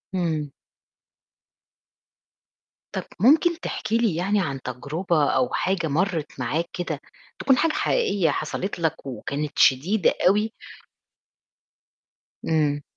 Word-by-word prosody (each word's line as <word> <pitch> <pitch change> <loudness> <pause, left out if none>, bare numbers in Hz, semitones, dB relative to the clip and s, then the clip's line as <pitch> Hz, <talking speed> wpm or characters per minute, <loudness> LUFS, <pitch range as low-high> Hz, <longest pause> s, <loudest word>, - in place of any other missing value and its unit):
إمم. 160 -5 -1 2.4
طَب - - -3 0.2
ممكن 320 - +4
تحكي 225 -8 -2
لي 230 -7 +1
يعني 195 +5 +1
عن 140 -6 -3
تجربة 145 +5 -1
أو 250 - +2
حاجة 185 -3 0
مرّت 160 -1 -1
معاك 150 +8 -1
كده 175 - -3 0.4
تكون 265 -2 +3
حاجة 330 - +2
حقيقية 205 - +1
حصلت 165 +6 -3
لك 160 -3 -1
وكانت 140 +3 -4
شديدة 170 +10 +4
أوي؟ 210 +4 +3 1.9
إمم. 150 -2 +1
170 Hz, 100 wpm, -24 LUFS, 150-205 Hz, 2.4 s, ممكن